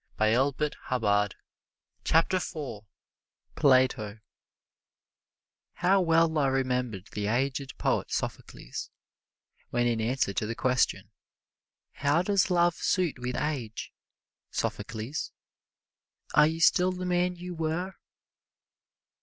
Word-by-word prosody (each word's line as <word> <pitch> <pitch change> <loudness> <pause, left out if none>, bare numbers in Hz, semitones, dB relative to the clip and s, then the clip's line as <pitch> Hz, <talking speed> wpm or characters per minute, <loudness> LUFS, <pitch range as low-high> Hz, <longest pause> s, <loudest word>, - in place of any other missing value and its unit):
[Illustration: 130 +7 +2 1.3
PLATO] 155 - 0 0.7
PLATO 130 -6 +3 1.5
How 190 +2 +3
well 165 -2 +3
I 140 - +3
remember 125 -6 0
the 105 -1 -3
aged 135 +4 -1
poet - - 0
Sophocles, - - -5 0.8
when 120 0 +1
in 115 -2 +1
answer 115 -3 0
to 105 - -1
the 115 - -3
question, 130 +1 +1 0.8
"How 145 +5 +1
does 200 0 +2
love 175 -1 +3
suit 175 -8 0
with 125 0 -3
age, 130 -8 -3 0.6
Sophocles 115 +7 -3 1.0
are 150 0 +6
you 160 +1 -2
still 180 +2 +5
the 185 0 -5
man 180 0 +1
you 180 +1 -7
were?" 165 +3 -2
140 Hz, 95 wpm, -28 LUFS, 120-175 Hz, 1.5 s, are